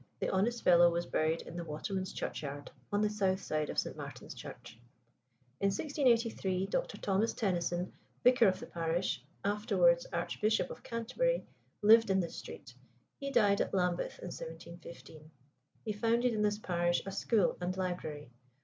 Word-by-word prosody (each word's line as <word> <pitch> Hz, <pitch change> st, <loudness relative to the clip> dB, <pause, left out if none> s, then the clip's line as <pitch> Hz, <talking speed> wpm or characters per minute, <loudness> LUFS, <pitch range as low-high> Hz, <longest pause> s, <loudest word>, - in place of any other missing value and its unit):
The -, -, -1 dB
honest 230 Hz, +5 st, +1 dB
fellow 175 Hz, -1 st, +7 dB
was 170 Hz, 0 st, -1 dB
buried 160 Hz, 0 st, 0 dB
in -, -, -10 dB
"The 170 Hz, -, -3 dB
Waterman's 185 Hz, +5 st, -4 dB
Churchyard," 145 Hz, -1 st, -5 dB, 0.2 s
on 205 Hz, 0 st, +2 dB
the 210 Hz, -, +3 dB
south 190 Hz, -3 st, +1 dB
side 155 Hz, -4 st, -2 dB
of -, -, -5 dB
St. -, -, -1 dB
Martin's -, -, -8 dB
Church. 110 Hz, -, -10 dB, 0.8 s
In 200 Hz, -, +2 dB
1683 230 Hz, -6 st, +1 dB
Dr. -, -, -2 dB
Thomas 200 Hz, +3 st, 0 dB
Tenison, 175 Hz, -3 st, -1 dB, 0.3 s
vicar 250 Hz, -3 st, +6 dB
of 185 Hz, -1 st, +1 dB
the -, -, -7 dB
parish, 165 Hz, -5 st, -1 dB, 0.2 s
afterwards -, -, +3 dB
Archbishop 215 Hz, +1 st, 0 dB
of -, -, -9 dB
Canterbury, 255 Hz, -, -1 dB, 0.4 s
lived 225 Hz, +1 st, +7 dB
in 190 Hz, 0 st, +3 dB
this 170 Hz, -3 st, -3 dB
street; 120 Hz, -, -9 dB, 0.5 s
he 275 Hz, -, -3 dB
died 210 Hz, -7 st, +4 dB
at -, -, -1 dB
Lambeth 180 Hz, -2 st, 0 dB
in 180 Hz, -, -7 dB
1715. 165 Hz, -1 st, -10 dB, 0.6 s
He 215 Hz, -, -1 dB
founded 235 Hz, +3 st, +2 dB
in 215 Hz, -, 0 dB
this 210 Hz, 0 st, +2 dB
parish 175 Hz, -3 st, 0 dB
a 195 Hz, -, -4 dB
school 200 Hz, 0 st, +2 dB
and 180 Hz, +1 st, -2 dB
library. 160 Hz, -7 st, -4 dB
190 Hz, 160 wpm, -33 LUFS, 170-225 Hz, 0.8 s, fellow